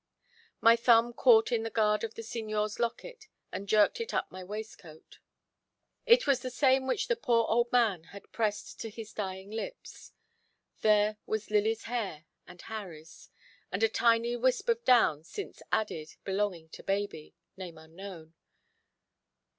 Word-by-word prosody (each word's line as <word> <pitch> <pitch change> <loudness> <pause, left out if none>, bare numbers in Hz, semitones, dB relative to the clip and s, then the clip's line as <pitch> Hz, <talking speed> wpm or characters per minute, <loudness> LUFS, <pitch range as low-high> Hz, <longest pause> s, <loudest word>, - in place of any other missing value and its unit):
My 230 0 +7
thumb 235 0 +4
caught 230 -1 +5
in 235 -2 +1
the 225 - -3
guard 210 -1 +1
of 225 -1 -4
the 230 - -7
Signor's 215 -2 -3
locket, 435 - -4 0.2
and 195 +1 -6
jerked 210 - +4
it 460 - -4
up - - -1
my 185 0 -8
waistcoat. 195 -5 -10 0.9
It 475 +1 +6
was 275 -2 +3
the 255 - -5
same 260 +1 +2
which 265 - 0
the 485 - +2
poor 235 - +2
old 235 +1 +1
man 215 -9 +2
had 200 +3 -13
pressed 210 -2 -2
to 225 - -5
his 220 0 -9
dying 190 -1 -5
lips. 365 - -7 0.7
There 210 0 +3
was 215 -1 -3
Lily's 215 +2 +1
hair 200 -10 -4 0.2
and 180 0 -13
Harry's, 170 -8 -9 0.4
and 200 +4 -1
a 225 - +5
tiny 230 +1 +2
wisp 255 - 0
of 470 0 +1
down 195 - +4
since 400 - -8
added, 160 -8 -2
belonging 190 -4 -2
to - - -11
baby 195 -5 -3 0.2
name 180 -4 -8
unknown. 165 0 -11
220 Hz, 155 wpm, -30 LUFS, 195-235 Hz, 0.9 s, My